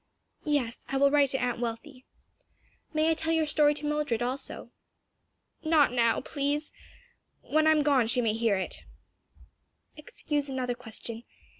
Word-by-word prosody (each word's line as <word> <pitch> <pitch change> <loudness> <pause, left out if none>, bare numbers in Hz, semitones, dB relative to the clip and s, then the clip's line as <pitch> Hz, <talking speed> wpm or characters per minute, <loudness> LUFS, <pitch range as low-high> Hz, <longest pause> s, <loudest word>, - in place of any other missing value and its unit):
Yes, 275 -6 -1
I 270 - -1
will 280 +1 +4
write 285 -2 +4
to 265 - 0
Aunt 245 -2 -1
Wealthy. 245 +3 -6 0.9
May 315 +1 +2
I - - +4
tell 320 +1 -1
your 320 -1 +2
story 295 0 +3
to 295 - -6
Mildred 295 -6 -1
also?" 260 +3 -3 0.9
"Not 315 -4 +4
now, 235 -2 +2
please. 290 +1 -2 0.7
When 310 +1 +1
I - - +7
am 305 -1 +3
gone 275 -5 +3
she 240 - +1
may 225 -3 +1
hear 225 -2 +1
it." 190 - -5 1.1
"Excuse 295 -1 -3
another 255 -2 -2
question. 230 -1 -6
280 Hz, 150 wpm, -28 LUFS, 240-300 Hz, 1.1 s, I